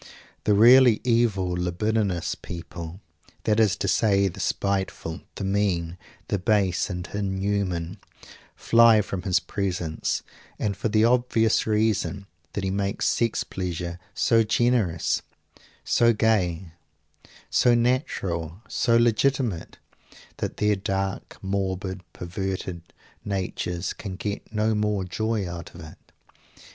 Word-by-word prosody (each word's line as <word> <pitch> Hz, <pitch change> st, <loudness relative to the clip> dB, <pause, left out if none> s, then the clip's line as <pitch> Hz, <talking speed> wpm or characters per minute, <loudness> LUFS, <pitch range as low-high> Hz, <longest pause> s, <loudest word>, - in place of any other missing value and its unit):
The 105 Hz, -, +4 dB
really 120 Hz, +1 st, +7 dB
evil 115 Hz, -6 st, +2 dB
libidinous 90 Hz, +2 st, -1 dB
people, 85 Hz, +1 st, -8 dB, 0.4 s
that 110 Hz, 0 st, +2 dB
is 105 Hz, -5 st, +4 dB
to -, -, -3 dB
say 100 Hz, 0 st, +3 dB
the 90 Hz, -, -6 dB
spiteful, 95 Hz, -3 st, -2 dB
the -, -, -5 dB
mean, 95 Hz, -4 st, 0 dB, 0.3 s
the 100 Hz, -, -1 dB
base 100 Hz, -3 st, +1 dB
and 90 Hz, -1 st, -4 dB
inhuman, 95 Hz, -2 st, -2 dB, 0.6 s
fly 115 Hz, -2 st, +5 dB
from 95 Hz, -2 st, -4 dB
his 90 Hz, -2 st, +2 dB
presence, 90 Hz, -5 st, -2 dB, 0.3 s
and 100 Hz, -2 st, -1 dB
for 110 Hz, -, -2 dB
the 110 Hz, +1 st, +4 dB
obvious 120 Hz, -3 st, +2 dB
reason 105 Hz, -2 st, 0 dB, 0.3 s
that 100 Hz, -, -3 dB
he 95 Hz, -, -1 dB
makes 100 Hz, 0 st, -1 dB
sex 115 Hz, -2 st, +1 dB
pleasure 90 Hz, -2 st, -4 dB, 0.2 s
so 115 Hz, -1 st, +4 dB
generous, 110 Hz, -6 st, +1 dB, 0.6 s
so 115 Hz, 0 st, +4 dB
gay, 95 Hz, -6 st, +1 dB, 0.8 s
so 120 Hz, -1 st, +4 dB
natural, 100 Hz, -, -1 dB
so 115 Hz, -1 st, +2 dB
legitimate, 120 Hz, -4 st, +1 dB, 0.6 s
that -, -, -4 dB
their 105 Hz, 0 st, +2 dB
dark 95 Hz, 0 st, -3 dB
morbid 95 Hz, -1 st, -2 dB
perverted 95 Hz, 0 st, -4 dB, 0.4 s
natures 95 Hz, -2 st, -3 dB
can 95 Hz, -3 st, -7 dB
get 100 Hz, +3 st, -5 dB
no 110 Hz, 0 st, +1 dB
more 105 Hz, -2 st, 0 dB
joy 110 Hz, +2 st, -2 dB
out 85 Hz, -1 st, -8 dB
of 85 Hz, -, -10 dB
it. 80 Hz, -1 st, -11 dB
100 Hz, 120 wpm, -25 LUFS, 90-110 Hz, 0.8 s, really